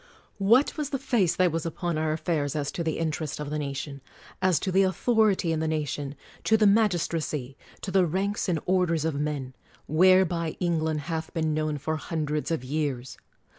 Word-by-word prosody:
What 230 +11 +4
was 300 -2 -2
the 275 - -1
face 240 -10 +1
that 185 -2 +3
was 165 0 -2
upon 170 +1 -2
our 155 0 0
affairs 155 -3 -1
as 145 -2 -1
to 170 - -3
the 160 -2 -1
interest 155 -2 -2
of 150 -1 -5
the 150 - -1
nation; 140 -1 -5 0.4
as 185 -3 +3
to 190 - -1
the 190 +1 +4
author 220 +4 +3
ity 185 -4 0
in 160 - -1
the 160 - -1
nation; 145 -2 -2 0.3
to 220 - +4
the 215 - +3
magistracy; 170 - +1 0.3
to 190 - -4
the 185 -1 +4
ranks 195 +4 -1
and 165 -3 +1
orders 175 -4 +1
of 160 - 0
men, 140 -3 -3 0.2
— - - -27
whereby 175 0 +3
England 160 -3 0
hath 160 +1 -4
been 160 -2 0
known 155 -1 -1
for 155 +3 -2
hundreds 155 -2 -2
of 165 -6 -1
years? 135 -2 -3
160 Hz, 195 wpm, -27 LUFS, 150-185 Hz, 0.4 s, What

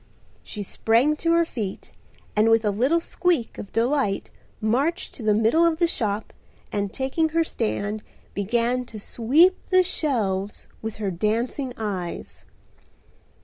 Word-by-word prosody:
She 210 - -6
sprang 235 +9 +2
to 335 +1 +1
her 335 0 +4
feet 215 -11 -5 0.4
and 215 +2 +4
with 225 -1 +4
a 205 - +3
little 260 +11 +2
squeak 335 -7 0
of 200 - -8
delight 230 -3 0 0.3
marched 265 +11 0
to - - -10
the 215 -1 +3
middle 225 +10 +4
of 335 -1 +3
the 340 - +3
shop 215 -10 -2 0.4
and 200 -1 -1
taking 270 +5 0
her 330 +1 +2
stand 215 -6 -2 0.3
began 235 +5 0
to 220 -2 -9
sweep 290 - +4
the 370 0 +5
shelves 210 - -1
with 220 -1 -4
her 205 -3 -2
dancing 230 +8 -1
eyes. 190 -6 -5
230 Hz, 145 wpm, -24 LUFS, 210-305 Hz, 0.4 s, the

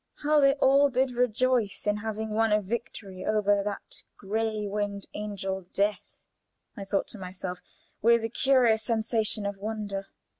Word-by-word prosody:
How 300 +1 +4
they 275 -1 +5
all 280 +1 +5
did 260 0 +1
rejoice 245 -3 +1
in 205 0 +1
having 220 0 -4
won 225 +1 +2
a 210 - +4
victory 205 -3 -5
over 205 -1 +2
that 205 0 -5 0.2
gray 215 +1 -2
winged 200 0 -3
angel, 195 -3 -4
Death! 205 +1 -1 0.5
I 200 - -7
thought 195 0 0
to 215 - -9
myself, 180 -1 -6 0.4
with 235 +1 +4
a 225 - -1
curious 245 -3 +3
sensation 220 -2 0
of 200 0 -3
wonder. 205 -1 -4
215 Hz, 150 wpm, -28 LUFS, 200-235 Hz, 0.5 s, they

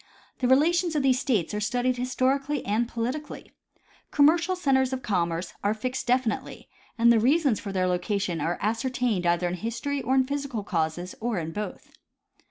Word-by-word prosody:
The 250 - +1
relations 325 +6 +3
of 290 - +1
these 260 -2 +3
States 215 - 0
are 210 - -1
studied 245 +4 0
historically 265 +3 0
and 220 +4 +1
politically. 250 +6 -5 0.6
Commercial 330 +5 +3
centers 270 -7 +2
of 260 - -4
commerce 170 -3 -1
are 205 +2 +1
fixed 255 +4 -4
definitely, 250 -2 -1 0.3
and 235 0 +5
the 225 - +4
reasons 275 0 +3
for 200 - -6
their 185 -1 0
locations 180 -2 -1
are 165 +3 -1
ascertained 230 -3 0
either 175 +1 +2
in 175 - -2
history 235 +8 -3
or 265 - 0
in 260 -1 +4
physical 280 -5 -3
causes, 175 -1 -2
or 230 -2 -1
in 165 -1 -3
both. 210 +4 -6
240 Hz, 170 wpm, -26 LUFS, 200-270 Hz, 0.6 s, and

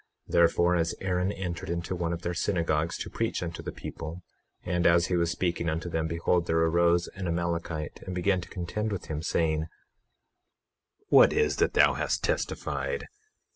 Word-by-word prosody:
21:5 - - -9
Therefore, 85 +1 +4
as 85 -1 0
Aaron 90 0 0
entered 90 -5 -5
into 85 +2 -2
one 85 -1 -1
of 85 0 -4
their 90 - -1
synagogues 85 -3 0
to - - -5
preach - - -1
unto 85 -1 -5
the - - -5
people, 85 +4 -7 0.4
and 90 -1 +1
as 85 0 +5
he 90 - 0
was 85 -1 +2
speaking 85 0 -1
unto 80 +2 -2
them, 80 -1 0
behold 85 +2 0
there 80 - +1
arose 85 +1 +3
an 95 -1 -6
Amalekite 85 -2 -2
and 95 - -4
began 90 +1 +1
to - - -10
contend 105 +4 -3
with 100 - -4
him, 75 -1 -3
saying: 80 -1 0 1.4
What - - +7
is 455 - +1
that - - +1
thou - - +6
hast - - -1
testified? 470 - -2
85 Hz, 175 wpm, -28 LUFS, 85-90 Hz, 1.4 s, What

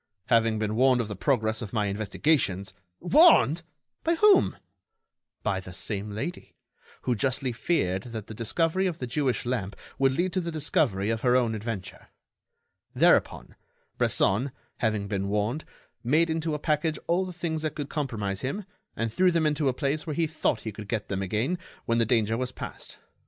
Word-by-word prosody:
"Having 115 -2 +3
been 110 0 -1
warned 130 +1 +4
of 115 -3 -2
the 105 - -4
progress 110 -1 0
of 110 -2 -7
my 105 -3 +1
investigations——" 100 - 0 0.3
"Warned! 180 - +6 0.4
by 335 +1 +2
whom?" 405 +2 +5 0.9
"By 100 -3 0
the 95 -1 -10
same 105 +1 -2
lady, 110 +13 -6 0.5
who 125 - +1
justly 130 +3 0
feared 110 - 0
that 110 -3 -5
the 110 - -9
discovery 165 - 0
of 170 -3 -3
the 125 - -4
Jewish 125 -2 -1
lamp 115 -6 -2 0.2
would 135 -1 +4
lead 175 +6 0
to 185 - +1
the 170 - -4
discovery 125 -9 +1
of 115 -1 -2
her 125 -1 +3
own 120 -3 +2
adventure. 110 -3 -6 0.9
Thereupon, - - +3 0.5
Bresson, 120 +9 +2 0.3
having 110 -3 0
been 100 -1 -2
warned, 105 +8 -1 0.4
made 160 +7 +3
into 160 -1 -1
a - - -4
package 155 +1 0
all 175 +3 +2
the 185 - -5
things 165 -3 -3
that 155 -1 -2
could 145 -2 -4
compromise 105 -10 -3
him 160 +10 -3 0.3
and 115 -1 -2
threw 185 +6 +4
them 165 -2 +1
into 150 -2 +2
a - - +3
place 145 +4 -2
where 155 - -2
he 165 - +2
thought 155 -7 -1
he 110 - -5
could 105 0 -9
get 110 -1 -3
them 95 -1 -2
again 110 - -1 0.3
when 115 0 +1
the 115 - +2
danger 115 -2 +2
was 125 0 -2
past. - - -8
125 Hz, 180 wpm, -27 LUFS, 105-155 Hz, 0.9 s, Warned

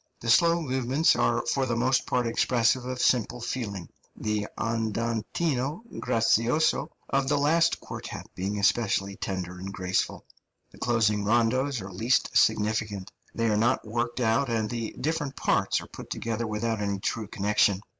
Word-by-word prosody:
The 115 - 0
slow 170 +5 +5
movements 130 +3 +2
are - - +1
for 135 -1 0
the 120 - 0
most 125 +2 +1
part 125 -1 +1
expressive 120 +1 +2
of 130 0 -4
simple 125 0 +2
feeling, 110 -7 -4 0.3
the 105 -1 -2
andantino 115 - -1 0.2
grazioso 120 +7 +2 0.2
of 135 -1 +1
the 145 - +3
last 165 +4 +3
quartet - - -7
being 100 +3 -3
especially 100 -1 +1
tender 90 -3 -4
and 95 +1 -6
graceful. 95 -1 -2 0.5
The - - -17
closing 110 -4 +2
rondos 120 +4 +1
are 95 - -8
least 115 +7 +1
significant; 105 -2 +1 0.2
they 115 - 0
are 110 -2 +2
not 115 +3 +2
worked 120 +3 -2
out, 120 +4 +2
and 110 -2 0
the 115 0 -4
different 150 -2 -2
parts - - +1
are - - -10
put - - -11
together 115 0 -3
without 110 +1 -2
any 100 -1 -1
true 105 +2 -3
connection. 100 -1 +2
115 Hz, 155 wpm, -27 LUFS, 105-130 Hz, 0.5 s, slow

